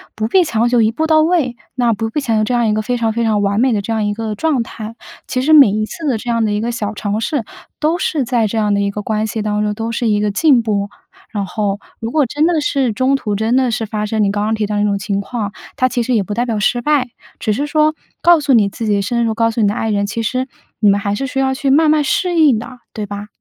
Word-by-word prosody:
不 215 Hz, 0 st, -1 dB
必 365 Hz, +10 st, +4 dB
强 235 Hz, -7 st, 0 dB
求 240 Hz, -1 st, +3 dB
一 220 Hz, -, +3 dB
步 315 Hz, +7 st, -1 dB
到 315 Hz, -1 st, +4 dB
位。 310 Hz, -7 st, +1 dB, 0.2 s
那 240 Hz, -2 st, +2 dB
不 225 Hz, +1 st, -3 dB
必 260 Hz, -, -2 dB
强 225 Hz, -5 st, 0 dB
求 -, -, +2 dB
这 245 Hz, +3 st, 0 dB
样 240 Hz, -1 st, +2 dB
一 210 Hz, -, +2 dB
个 215 Hz, -, 0 dB
非 245 Hz, +3 st, -2 dB
常 225 Hz, -2 st, 0 dB
非 235 Hz, +1 st, -1 dB
常 215 Hz, -2 st, +1 dB
完 200 Hz, +1 st, +1 dB
美 255 Hz, +2 st, +3 dB
的 210 Hz, -3 st, 0 dB
这 225 Hz, +3 st, -3 dB
样 220 Hz, -1 st, 0 dB
一 205 Hz, 0 st, -1 dB
个 220 Hz, -1 st, -3 dB
状 275 Hz, +2 st, 0 dB
态。 225 Hz, 0 st, -8 dB, 0.3 s
其 255 Hz, -, -1 dB
实 310 Hz, +3 st, +3 dB
每 285 Hz, -7 st, +8 dB
一 215 Hz, +2 st, -1 dB
次 315 Hz, +8 st, -6 dB
的 255 Hz, -5 st, +1 dB
这 240 Hz, +2 st, -4 dB
样 230 Hz, -1 st, +1 dB
的 215 Hz, -, 0 dB
一 205 Hz, -, 0 dB
个 235 Hz, +2 st, -2 dB
小 215 Hz, -3 st, -3 dB
尝 205 Hz, +1 st, -2 dB
试， 265 Hz, +2 st, -1 dB, 0.4 s
都 325 Hz, +4 st, +1 dB
是 300 Hz, -8 st, 0 dB
在 235 Hz, -2 st, +1 dB
这 225 Hz, -, -3 dB
样 210 Hz, -2 st, +1 dB
的 200 Hz, -, +1 dB
一 200 Hz, -, 0 dB
个 210 Hz, +1 st, -5 dB
关 215 Hz, 0 st, -1 dB
系 220 Hz, 0 st, -3 dB
当 210 Hz, 0 st, -1 dB
中， 210 Hz, 0 st, -1 dB
都 225 Hz, +1 st, -3 dB
是 230 Hz, +1 st, -1 dB
一 210 Hz, -1 st, +2 dB
个 210 Hz, 0 st, 0 dB
进 260 Hz, +1 st, +3 dB
步。 205 Hz, -2 st, -1 dB, 0.4 s
然 205 Hz, -2 st, -2 dB
后， 205 Hz, +1 st, -2 dB, 0.2 s
如 225 Hz, +1 st, -4 dB
果 300 Hz, -3 st, +2 dB
真 295 Hz, +6 st, 0 dB
的 330 Hz, -3 st, +1 dB
是 270 Hz, -5 st, 0 dB
中 260 Hz, +4 st, +2 dB
途 210 Hz, -6 st, -3 dB
真 220 Hz, +4 st, +1 dB
的 260 Hz, -1 st, +2 dB
是 225 Hz, 0 st, -2 dB
发 210 Hz, 0 st, -3 dB
生 215 Hz, 0 st, 0 dB
你 200 Hz, -, +2 dB
刚 205 Hz, 0 st, -1 dB
刚 220 Hz, +1 st, 0 dB
提 215 Hz, -1 st, -1 dB
到 210 Hz, 0 st, -2 dB
的 205 Hz, -, +1 dB
那 210 Hz, -, +2 dB
种 200 Hz, -, 0 dB
情 200 Hz, 0 st, -2 dB
况， 205 Hz, 0 st, -4 dB, 0.2 s
它 255 Hz, -, +2 dB
其 245 Hz, -1 st, -1 dB
实 250 Hz, +2 st, -1 dB
也 215 Hz, -4 st, +2 dB
不 205 Hz, -, -5 dB
代 240 Hz, +3 st, 0 dB
表 225 Hz, -3 st, -2 dB
失 240 Hz, +4 st, +1 dB
败， 275 Hz, -2 st, +1 dB, 0.3 s
只 215 Hz, -, -1 dB
是 280 Hz, +8 st, -1 dB
说 305 Hz, +1 st, +2 dB, 0.3 s
告 345 Hz, -1 st, +6 dB
诉 285 Hz, -2 st, +1 dB
你 210 Hz, -4 st, +4 dB
自 225 Hz, -, -6 dB
己， 205 Hz, -2 st, +1 dB
深 235 Hz, +4 st, 0 dB
入 225 Hz, -, 0 dB
告 230 Hz, +1 st, +1 dB
诉 225 Hz, -, -4 dB
你 205 Hz, -, +4 dB
的 205 Hz, -, +1 dB
爱 225 Hz, -1 st, -2 dB
人， 200 Hz, -1 st, 0 dB
其 210 Hz, +3 st, -3 dB
实 255 Hz, +3 st, -1 dB, 0.3 s
你 210 Hz, -, +3 dB
们 200 Hz, -, +4 dB
还 200 Hz, 0 st, -2 dB
是 270 Hz, +6 st, -2 dB
需 265 Hz, -, -6 dB
要 265 Hz, 0 st, +1 dB
去 270 Hz, +1 st, -1 dB
慢 305 Hz, +3 st, +4 dB
慢 305 Hz, -1 st, +3 dB
适 355 Hz, +4 st, 0 dB
应 290 Hz, -7 st, +5 dB
的， 245 Hz, +3 st, -8 dB
对 215 Hz, -2 st, -4 dB
吧？ 205 Hz, 0 st, -7 dB
225 Hz, 325 characters per minute, -17 LUFS, 210-260 Hz, 0.4 s, 每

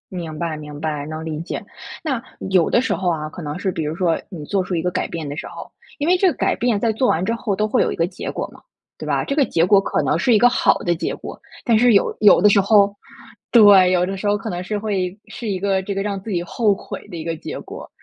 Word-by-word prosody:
明 160 Hz, -3 st, -5 dB
白， 165 Hz, -2 st, -3 dB
明 150 Hz, -1 st, -9 dB
白， 150 Hz, -2 st, -3 dB
能 155 Hz, +1 st, -6 dB
理 155 Hz, -2 st, -4 dB
解。 165 Hz, -, -5 dB, 0.4 s
那， 265 Hz, -7 st, -2 dB, 0.3 s
有 180 Hz, -3 st, +3 dB
的 240 Hz, -, +3 dB
时 240 Hz, -5 st, -1 dB
候 180 Hz, 0 st, -1 dB
啊， 155 Hz, -2 st, -2 dB
可 175 Hz, -, -9 dB
能 150 Hz, +1 st, -5 dB
是 190 Hz, 0 st, -1 dB
比 160 Hz, -, -3 dB
如 150 Hz, +2 st, -3 dB
说 170 Hz, -2 st, +1 dB
你 170 Hz, -7 st, -8 dB
做 195 Hz, +2 st, 0 dB
出 185 Hz, 0 st, -3 dB
一 165 Hz, -, 0 dB
个 180 Hz, +2 st, -1 dB
改 -, -, -2 dB
变 160 Hz, -3 st, -5 dB
的 145 Hz, -, -5 dB
时 -, -, -5 dB
候， -, -, -10 dB, 0.3 s
因 295 Hz, -, -1 dB
为 365 Hz, -, +4 dB
这 380 Hz, -, +3 dB
个 -, -, -2 dB
改 -, -, +1 dB
变 240 Hz, -3 st, +1 dB
在 225 Hz, +2 st, +1 dB
做 245 Hz, +4 st, 0 dB
完 170 Hz, -, +1 dB
之 230 Hz, -, 0 dB
后 220 Hz, -3 st, -2 dB
都 215 Hz, -, 0 dB
会 -, -, +2 dB
有 -, -, +1 dB
一 -, -, -3 dB
个 165 Hz, -, +1 dB
结 185 Hz, +1 st, -6 dB
果 -, -, -3 dB
嘛， -, -, -17 dB, 0.4 s
对 -, -, -7 dB
吧？ -, -, 0 dB
这 275 Hz, -, -3 dB
个 280 Hz, -, +4 dB
结 165 Hz, -5 st, +1 dB
果 195 Hz, +2 st, +5 dB
可 195 Hz, -, -1 dB
能 150 Hz, +4 st, +1 dB
是 240 Hz, +6 st, +3 dB
一 -, -, +6 dB
个 245 Hz, +3 st, +5 dB
好 -, -, +2 dB
的 175 Hz, -, 0 dB
结 165 Hz, -, -3 dB
果， -, -, -9 dB, 0.2 s
但 230 Hz, -3 st, +3 dB
是 245 Hz, 0 st, +5 dB
有 200 Hz, -, +2 dB
有 210 Hz, -, +6 dB
的 210 Hz, -, +6 dB
时 200 Hz, -, +4 dB
候 200 Hz, 0 st, +4 dB, 0.6 s
对， 200 Hz, -5 st, +7 dB
有 180 Hz, 0 st, +2 dB
的 195 Hz, +1 st, -4 dB
时 205 Hz, -, -3 dB
候 205 Hz, 0 st, +2 dB
可 220 Hz, -, -6 dB
能 175 Hz, 0 st, -4 dB
是 210 Hz, +3 st, -3 dB
会 195 Hz, -3 st, -2 dB
是 235 Hz, -, -7 dB
一 195 Hz, -2 st, -1 dB
个 195 Hz, 0 st, 0 dB
这 195 Hz, +1 st, -5 dB
个 195 Hz, -, -1 dB
让 200 Hz, -1 st, -3 dB
自 225 Hz, -, -9 dB
己 175 Hz, -4 st, -1 dB
后 210 Hz, +3 st, +1 dB
悔 205 Hz, -, -9 dB
的 180 Hz, -, -9 dB
一 160 Hz, -, -5 dB
个 165 Hz, 0 st, -2 dB
结 -, -, -7 dB
果。 -, -, -10 dB
190 Hz, 315 characters per minute, -20 LUFS, 165-210 Hz, 0.6 s, 对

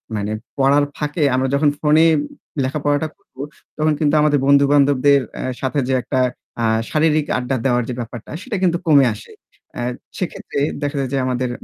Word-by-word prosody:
মানে 105 Hz, 0 st, -2 dB, 0.3 s
পড়ার 140 Hz, +2 st, +4 dB
ফাঁকে 150 Hz, +1 st, -2 dB
আমরা 130 Hz, +1 st, +1 dB
যখন 145 Hz, +1 st, +3 dB
ফোনে 155 Hz, +1 st, +4 dB, 0.6 s
লেখাপড়াটা 145 Hz, +2 st, 0 dB
করব 200 Hz, -, -37 dB, 0.4 s
তখন 155 Hz, 0 st, +2 dB
কিন্তু 150 Hz, -1 st, +2 dB
আমাদের 150 Hz, -1 st, +3 dB
বন্ধুবান্ধবদের 140 Hz, 0 st, +4 dB, 0.2 s
আ -, -, -3 dB, 0.2 s
সাথে 135 Hz, +2 st, -1 dB
যে 135 Hz, -, 0 dB
একটা 130 Hz, +2 st, -2 dB, 0.4 s
আ -, -, +1 dB, 0.3 s
শারীরিক 155 Hz, -1 st, +2 dB
আড্ডা 125 Hz, +1 st, -2 dB
দেওয়ার 125 Hz, -2 st, +2 dB
যে -, -, -2 dB
ব্যাপারটা 120 Hz, -1 st, -7 dB
সেটা 225 Hz, -3 st, -4 dB
কিন্তু 175 Hz, -1 st, +2 dB
কমে 145 Hz, -4 st, +6 dB
আসে। -, -, -12 dB, 0.5 s
আ -, -, -2 dB, 0.4 s
সেক্ষেত্রে 175 Hz, -5 st, -4 dB, 0.2 s
দেখা 145 Hz, +1 st, -2 dB
যায় 135 Hz, -, -2 dB
যে -, -, +1 dB
আমাদের 125 Hz, -1 st, -1 dB
145 Hz, 165 wpm, -19 LUFS, 130-150 Hz, 0.6 s, কমে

